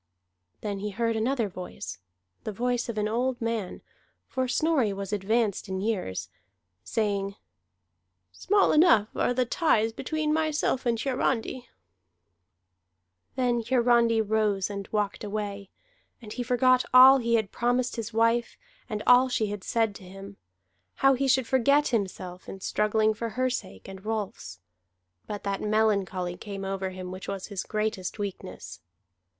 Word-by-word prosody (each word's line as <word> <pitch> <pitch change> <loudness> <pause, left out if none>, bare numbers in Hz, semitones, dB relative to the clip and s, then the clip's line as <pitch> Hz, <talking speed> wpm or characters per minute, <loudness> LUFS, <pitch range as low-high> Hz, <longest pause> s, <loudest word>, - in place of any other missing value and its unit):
Then 205 -2 -3
he 210 +1 -3
heard 230 +2 -1
another 230 +1 0
voice, 180 - -8 0.4
the 215 - -3
voice 245 +3 -1
of 225 - -4
an 210 0 +1
old 245 +3 -1
man 225 -5 -3 0.4
for 260 -1 -1
Snorri 275 -4 +2
was 195 +1 -5
advanced 210 0 0
in 190 0 -2
years 195 - -2 0.6
saying: 200 -3 -1 1.0
"Small 405 +1 +2
enough 300 - +5
are - - +1
the 250 0 +1
ties 225 -5 +2
between 310 +4 -1
myself 310 -4 0
and 230 -1 +1
Hiarandi." 255 -1 -1 1.7
Then 245 -2 +1
Hiarandi 235 -1 +3
rose 210 -2 0
and 200 -1 -5
walked 210 -1 -1
away. 205 -1 -4 0.5
And 215 -3 -9
he 250 - -4
forgot 255 +1 +3
all 260 +2 +9
he 235 -1 +1
had 220 -3 0
promised 245 +1 0
his 230 -1 -4
wife, 230 +1 +1 0.3
and 215 -2 -3
all 250 +1 +6
she 220 -4 0
had 205 -2 -6
said 225 -3 +1
to - - -15
him: 195 +2 -11 0.6
how 270 0 +4
he 270 +1 0
should 260 -1 +3
forget 280 +4 +3
himself 185 -5 -3
in 195 - -7
struggling 215 +2 +1
for 230 +2 -4
her 255 +2 0
sake 95 - -6
and 190 0 -10
Rolf's. 205 - -4 0.7
But 205 -1 -5
that 200 -1 -2
melancholy 205 -4 0
came 195 -2 -6
over 195 0 -2
him 185 -1 -7
which 185 +1 -8
was 195 -1 -4
his 200 -3 -3
greatest 215 -3 -3
weakness. 185 - -6
220 Hz, 145 wpm, -27 LUFS, 200-245 Hz, 1.7 s, all